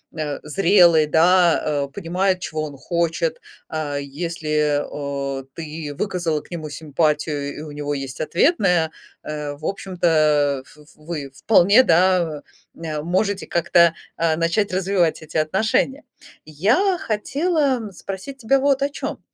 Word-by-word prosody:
а, 150 Hz, -3 st, -3 dB
зрелый, 170 Hz, -1 st, +4 dB
да, 160 Hz, -3 st, +3 dB
э, -, -, -10 dB
понимает, 185 Hz, +1 st, 0 dB
чего 155 Hz, -3 st, -4 dB
он 145 Hz, -2 st, -9 dB
хочет, 170 Hz, +1 st, -1 dB, 0.3 s
а 150 Hz, -2 st, -3 dB
если, 150 Hz, 0 st, -1 dB
а, 140 Hz, -2 st, -4 dB
ты 155 Hz, -2 st, -6 dB
выказала 175 Hz, -7 st, -1 dB
к -, -, -22 dB
нему 160 Hz, -3 st, -5 dB
симпатию, 150 Hz, -1 st, -1 dB
и -, -, -6 dB
у 155 Hz, -, -8 dB
него 145 Hz, 0 st, -3 dB
есть 135 Hz, -1 st, -6 dB
ответная, 175 Hz, -, +2 dB, 0.3 s
э, 150 Hz, -1 st, -4 dB
в 150 Hz, +2 st, -11 dB
общем-то, 155 Hz, -7 st, +1 dB
ф -, -, -19 dB, 0.2 s
вы 150 Hz, -3 st, -6 dB
вполне, 205 Hz, -, +5 dB
да, 170 Hz, -, +2 dB, 0.3 s
э, 155 Hz, -2 st, -4 dB
можете 190 Hz, +5 st, -1 dB
как-то, 170 Hz, 0 st, +4 dB, 0.2 s
а, 165 Hz, -1 st, +2 dB
начать 170 Hz, +4 st, 0 dB
развивать 185 Hz, -3 st, +1 dB
эти 155 Hz, 0 st, -5 dB
отношения. 215 Hz, -, 0 dB, 0.4 s
Я 225 Hz, -, +2 dB
хотела, 280 Hz, +6 st, 0 dB
м, 220 Hz, -4 st, -7 dB
спросить 195 Hz, +9 st, -7 dB
тебя 270 Hz, +2 st, +2 dB
вот 275 Hz, 0 st, +2 dB
о 280 Hz, -, +1 dB
чем. 280 Hz, -, -5 dB
165 Hz, 135 wpm, -21 LUFS, 150-190 Hz, 0.4 s, вполне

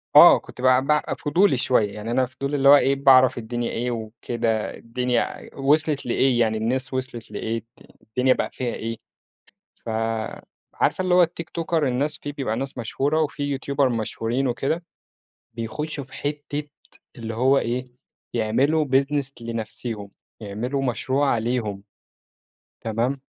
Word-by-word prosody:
آه، -, -, +10 dB
كُنت 125 Hz, -, -12 dB
بقى 130 Hz, 0 st, +5 dB
ب 150 Hz, 0 st, +3 dB, 0.2 s
فضولي 160 Hz, 0 st, +3 dB
شوية 110 Hz, -5 st, +2 dB
يعني 105 Hz, +2 st, -5 dB
أنا 130 Hz, +2 st, +2 dB
فضولي 140 Hz, +3 st, -4 dB
اللي 140 Hz, 0 st, +5 dB
هو 145 Hz, -, +11 dB
إيه 140 Hz, -1 st, +3 dB
باعرف 130 Hz, -2 st, +6 dB
الدنيا 120 Hz, +1 st, -3 dB
إيه 120 Hz, +2 st, -2 dB
وكده 115 Hz, 0 st, -2 dB
الدنيا 125 Hz, +1 st, 0 dB
ع -, -, -5 dB
وصلت 145 Hz, +1 st, +2 dB
لإيه 125 Hz, 0 st, +2 dB
يعني 110 Hz, -2 st, +2 dB
الناس 125 Hz, +4 st, -1 dB
وصلت 130 Hz, -3 st, -4 dB
لإيه، 115 Hz, +1 st, -3 dB, 0.4 s
الدنيا 125 Hz, +4 st, +2 dB
بقى -, -, -2 dB
فيها 125 Hz, -2 st, -3 dB
إيه، 115 Hz, 0 st, -4 dB, 0.9 s
ف -, -, -4 dB, 0.8 s
عارفة -, -, +1 dB
اللي 185 Hz, -1 st, +1 dB
هو 180 Hz, -, +7 dB
التيكتوكر 165 Hz, -2 st, -1 dB
الناس 140 Hz, +4 st, -1 dB
في 145 Hz, -, -6 dB
بيبقى 130 Hz, -6 st, -2 dB
ناس 135 Hz, +1 st, -4 dB
مشهورة 140 Hz, +7 st, 0 dB
وفي 145 Hz, -1 st, -2 dB
يوتيوبر 140 Hz, -1 st, 0 dB
مشهورين 115 Hz, +2 st, -1 dB
وكده، 135 Hz, +7 st, -1 dB, 0.7 s
بيخشوا 120 Hz, +7 st, -4 dB
في 130 Hz, -, -17 dB
حتة، 145 Hz, 0 st, -3 dB, 0.5 s
اللي 115 Hz, -2 st, -5 dB
هو 130 Hz, +4 st, +3 dB
إيه، 125 Hz, +1 st, -1 dB, 0.5 s
يعملوا 130 Hz, +8 st, +2 dB
business 140 Hz, +1 st, +1 dB
لنفسيهم، 110 Hz, -2 st, -5 dB, 0.3 s
يعملوا 115 Hz, +7 st, -3 dB
مشروع 135 Hz, +1 st, +1 dB
ليهم. 110 Hz, -4 st, -2 dB, 1.0 s
تمام، 120 Hz, +5 st, -1 dB
130 Hz, 140 wpm, -24 LUFS, 115-140 Hz, 1.0 s, هو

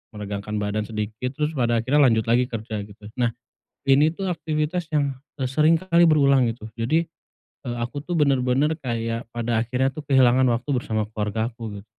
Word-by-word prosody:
meregangkan 105 Hz, 0 st, -5 dB
badan 105 Hz, 0 st, -2 dB
sedikit, 110 Hz, +4 st, -4 dB
terus 150 Hz, 0 st, -1 dB
pada 120 Hz, -6 st, +1 dB
akhirnya 145 Hz, +5 st, +2 dB
lanjut 110 Hz, -2 st, +2 dB
lagi 120 Hz, +2 st, +2 dB
kerja 110 Hz, -2 st, -5 dB
gitu. 105 Hz, 0 st, -17 dB, 0.2 s
Nah, 120 Hz, -2 st, +1 dB, 0.5 s
ini 140 Hz, +3 st, +5 dB
tuh 190 Hz, -2 st, -1 dB
aktivitas 160 Hz, +1 st, -2 dB
yang, 140 Hz, -2 st, +1 dB, 0.2 s
eee, 135 Hz, -, -2 dB
sering 155 Hz, +4 st, +4 dB
kali 170 Hz, -1 st, +3 dB
berulang 140 Hz, -5 st, +4 dB
gitu. 110 Hz, -1 st, -7 dB
Jadi, 155 Hz, +8 st, +2 dB, 0.7 s
eee, 120 Hz, -, -3 dB
aku 120 Hz, +4 st, -4 dB
tuh 175 Hz, +3 st, -3 dB
bener-bener 140 Hz, +1 st, +2 dB
kayak 115 Hz, -2 st, -3 dB
pada 115 Hz, -1 st, -1 dB
akhirnya 125 Hz, +3 st, 0 dB
tuh 155 Hz, -, -6 dB
kehilangan 130 Hz, -1 st, +5 dB
waktu 120 Hz, +4 st, -2 dB
bersama 110 Hz, -4 st, -1 dB
keluargaku 110 Hz, 0 st, -3 dB
gitu. -, -, -21 dB
125 Hz, 170 wpm, -23 LUFS, 110-145 Hz, 0.7 s, ini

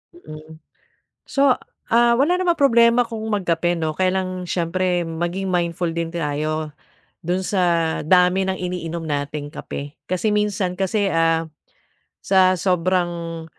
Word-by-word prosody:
Mm. 155 Hz, -, -12 dB, 0.7 s
So, 275 Hz, -3 st, +3 dB, 0.3 s
ah, 235 Hz, +1 st, +4 dB
wala 300 Hz, +9 st, +2 dB
namang 350 Hz, -3 st, +1 dB
problema 235 Hz, -3 st, +5 dB
kung 225 Hz, -1 st, -6 dB
magkape, 175 Hz, -3 st, 0 dB
'no. 160 Hz, -2 st, -2 dB
Kaya 185 Hz, -1 st, +2 dB
lang 185 Hz, -1 st, -5 dB
siyempre 180 Hz, +1 st, 0 dB
maging 175 Hz, +4 st, -3 dB
mindful 175 Hz, -1 st, -1 dB
din 165 Hz, 0 st, -4 dB
tayo 155 Hz, -1 st, -2 dB, 0.5 s
do'n 180 Hz, +3 st, -1 dB
sa 185 Hz, -1 st, 0 dB, 0.4 s
dami 180 Hz, +3 st, +3 dB
ng 190 Hz, -, -1 dB
iniinom 170 Hz, -2 st, -4 dB
nating 145 Hz, -1 st, -4 dB
kape. 145 Hz, -2 st, -7 dB
Kasi 185 Hz, +4 st, 0 dB
minsan 205 Hz, -3 st, 0 dB
kasi, 195 Hz, +2 st, 0 dB
ah, 165 Hz, 0 st, +2 dB, 0.8 s
sa 185 Hz, -1 st, +4 dB
sobrang 175 Hz, -2 st, -1 dB
180 Hz, 130 wpm, -21 LUFS, 165-195 Hz, 0.8 s, problema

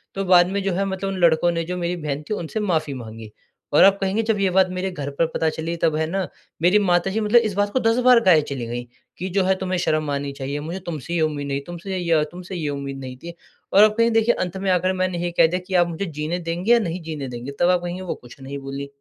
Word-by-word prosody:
तो 195 Hz, 0 st, -2 dB
बाद 180 Hz, -1 st, +6 dB
में 200 Hz, +1 st, -1 dB
जो 195 Hz, -1 st, 0 dB
है 195 Hz, +3 st, 0 dB
मतलब 195 Hz, 0 st, -3 dB
उन 195 Hz, -, -4 dB
लडकों 170 Hz, +1 st, +4 dB
ने 165 Hz, -1 st, -2 dB
जो 180 Hz, +2 st, -4 dB
मेरी 175 Hz, 0 st, -2 dB
बहन 150 Hz, -1 st, -3 dB
थी -, -, 0 dB
उनसे 190 Hz, +2 st, -4 dB
माफ़ी 160 Hz, -8 st, 0 dB
माँगी। 110 Hz, -3 st, -9 dB, 0.4 s
और -, -, +7 dB
आप 195 Hz, 0 st, +6 dB
कहेंगे 195 Hz, +3 st, 0 dB
जब 220 Hz, -2 st, 0 dB
ये 195 Hz, -1 st, +2 dB
बात 190 Hz, 0 st, +4 dB
मेरे 185 Hz, +1 st, -2 dB
घर 145 Hz, -6 st, -5 dB
पर 165 Hz, -, +4 dB
पता 160 Hz, -, +1 dB
चली 160 Hz, +2 st, -4 dB
तब 165 Hz, -2 st, +1 dB
है 160 Hz, +1 st, 0 dB
ना, 190 Hz, +1 st, -1 dB, 0.3 s
मेरी 180 Hz, +5 st, +5 dB
माता 180 Hz, -1 st, +2 dB
जी 215 Hz, -, -1 dB
मतलब 220 Hz, +2 st, +4 dB
इस -, -, -6 dB
बात 205 Hz, 0 st, +1 dB
को 260 Hz, -, +2 dB
10 225 Hz, -1 st, +2 dB
बार 250 Hz, -2 st, +8 dB
गाये 175 Hz, -6 st, +6 dB
चली 140 Hz, -4 st, -5 dB
गई 120 Hz, +1 st, -4 dB, 0.3 s
कि 185 Hz, -, -4 dB
जो 190 Hz, +1 st, +1 dB
है 190 Hz, +1 st, +2 dB
तुम्हें 185 Hz, -1 st, -2 dB
शर्म 155 Hz, -3 st, 0 dB
आनी 140 Hz, 0 st, -2 dB
चाहिए, 140 Hz, +1 st, -4 dB
मुझे 165 Hz, +5 st, -5 dB
तुमसे 160 Hz, 0 st, -5 dB
ये 170 Hz, -, +1 dB
उम्मीद 150 Hz, -2 st, -1 dB
नहीं, 140 Hz, 0 st, -2 dB
तुमसे 175 Hz, +2 st, -5 dB
य 165 Hz, -3 st, +2 dB
तुमसे 180 Hz, +1 st, -8 dB
ये 155 Hz, -4 st, -2 dB
उम्मीद 140 Hz, -1 st, -5 dB
नहीं 130 Hz, -1 st, -8 dB
थी। 170 Hz, 0 st, -7 dB, 0.4 s
और 200 Hz, -, +8 dB
अब 215 Hz, -, +6 dB
कहेंगे 230 Hz, 0 st, +3 dB
देखिए 230 Hz, +2 st, +2 dB
अंत 180 Hz, +1 st, -5 dB
में 190 Hz, 0 st, -2 dB
आकर 185 Hz, +1 st, +2 dB
मैंने 185 Hz, -1 st, -1 dB
ये 175 Hz, -, -1 dB
कह -, -, +7 dB
दिया 180 Hz, +3 st, -2 dB
कि 190 Hz, -, -2 dB
आप 175 Hz, -1 st, +4 dB
मुझे 170 Hz, +4 st, -4 dB
जीने 155 Hz, +2 st, -3 dB
देंगे 175 Hz, +5 st, -2 dB
या 240 Hz, -, +5 dB
नहीं 180 Hz, -4 st, -3 dB
जीने 155 Hz, -4 st, -5 dB
देंगे, 125 Hz, +2 st, -6 dB
तब 175 Hz, -, +4 dB
आप 180 Hz, -1 st, +3 dB
कहेंगे 175 Hz, +1 st, -4 dB
वो 185 Hz, -, -4 dB
कुछ 120 Hz, +2 st, -15 dB
नहीं 135 Hz, +1 st, -6 dB
बोलीं। 140 Hz, +1 st, -6 dB
175 Hz, 280 wpm, -22 LUFS, 150-190 Hz, 0.4 s, बार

